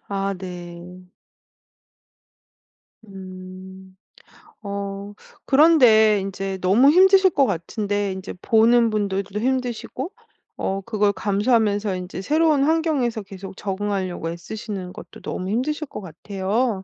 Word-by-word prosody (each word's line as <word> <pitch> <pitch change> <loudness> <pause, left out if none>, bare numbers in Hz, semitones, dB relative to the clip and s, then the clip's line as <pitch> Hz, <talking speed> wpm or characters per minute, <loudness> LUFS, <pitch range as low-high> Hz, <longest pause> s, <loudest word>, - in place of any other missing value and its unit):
아 195 0 -2
네. 180 0 -9 2.0
음. 190 -1 -11 0.7
어 200 0 -5 0.3
그런데 250 -8 +6
인제 195 0 -4
너무 215 +9 +5
힘드실 380 +3 +6
것 280 -2 +3
같은데 205 +2 -2
인제 190 +1 -7
보는 230 +1 +4
분들도 200 -1 -2
힘드시고 255 - -2 0.5
어 195 +1 -2
그걸 210 -3 +1
감수하면서 205 -1 +1
인제 180 +1 -6
새로운 305 +2 +2
환경에서 295 -8 +1
계속 195 0 -10
적응하려고 190 -4 -3
애쓰시는 185 +1 -6
것도 - - -12
너무 185 +1 -4
힘드실 295 +7 -1
것 - - -8
같아요. 195 - -2
205 Hz, 240 characters per minute, -22 LUFS, 190-240 Hz, 2.0 s, 그런데